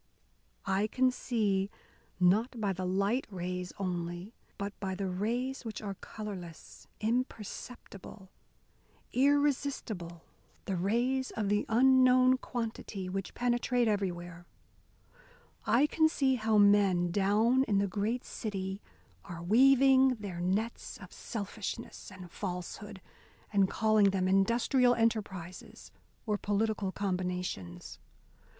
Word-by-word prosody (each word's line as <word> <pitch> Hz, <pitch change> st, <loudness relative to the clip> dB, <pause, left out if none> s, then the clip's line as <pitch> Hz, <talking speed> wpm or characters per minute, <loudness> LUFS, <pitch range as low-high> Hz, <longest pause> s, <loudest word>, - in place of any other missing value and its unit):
I 195 Hz, +2 st, +1 dB
can 255 Hz, +3 st, +2 dB
see, 205 Hz, -6 st, 0 dB, 0.5 s
not 215 Hz, +7 st, +2 dB
by 200 Hz, -3 st, 0 dB
the 185 Hz, 0 st, -3 dB
light 200 Hz, +7 st, 0 dB
rays 180 Hz, -1 st, -4 dB
only, 175 Hz, +1 st, -4 dB, 0.2 s
but 200 Hz, 0 st, -4 dB
by 190 Hz, -1 st, -3 dB
the 195 Hz, +1 st, -3 dB
rays 235 Hz, +9 st, -2 dB
which 225 Hz, -2 st, -6 dB
are 200 Hz, -2 st, -5 dB
colourless, 190 Hz, -5 st, -9 dB
imperceptible, 215 Hz, -4 st, -5 dB, 0.8 s
irresistible 265 Hz, -, 0 dB, 0.4 s
the 195 Hz, -, -2 dB
rays 240 Hz, +8 st, 0 dB
of 210 Hz, -3 st, -2 dB
the 205 Hz, 0 st, +1 dB
unknown 255 Hz, +1 st, +5 dB
quantity, 220 Hz, -6 st, -5 dB
which 195 Hz, 0 st, -4 dB
penetrate 245 Hz, 0 st, +1 dB
everywhere. 175 Hz, -4 st, -3 dB, 1.2 s
I 255 Hz, +5 st, +4 dB
can 315 Hz, +1 st, +3 dB
see 270 Hz, -4 st, +2 dB
how 220 Hz, -3 st, +1 dB
men 200 Hz, -4 st, +4 dB
down 215 Hz, +7 st, +3 dB
in 205 Hz, -5 st, +1 dB
the 200 Hz, -, +2 dB
great 215 Hz, +6 st, -2 dB
city 195 Hz, -2 st, -4 dB, 0.4 s
are 170 Hz, -1 st, -8 dB
weaving 265 Hz, +5 st, +5 dB
their 200 Hz, -6 st, -7 dB
nets 205 Hz, +6 st, -2 dB
of -, -, -13 dB
selfishness 210 Hz, -2 st, -6 dB
and 185 Hz, -2 st, -11 dB
falsehood, 190 Hz, +2 st, -6 dB, 0.5 s
and 195 Hz, -2 st, +3 dB
calling 215 Hz, -2 st, +3 dB
them 190 Hz, -1 st, 0 dB
industrial 235 Hz, +6 st, +3 dB
enterprises 200 Hz, -6 st, -3 dB, 0.3 s
or 210 Hz, -2 st, -1 dB
political 205 Hz, -1 st, 0 dB
combinations. 180 Hz, -, -4 dB
205 Hz, 110 wpm, -31 LUFS, 185-240 Hz, 1.2 s, unknown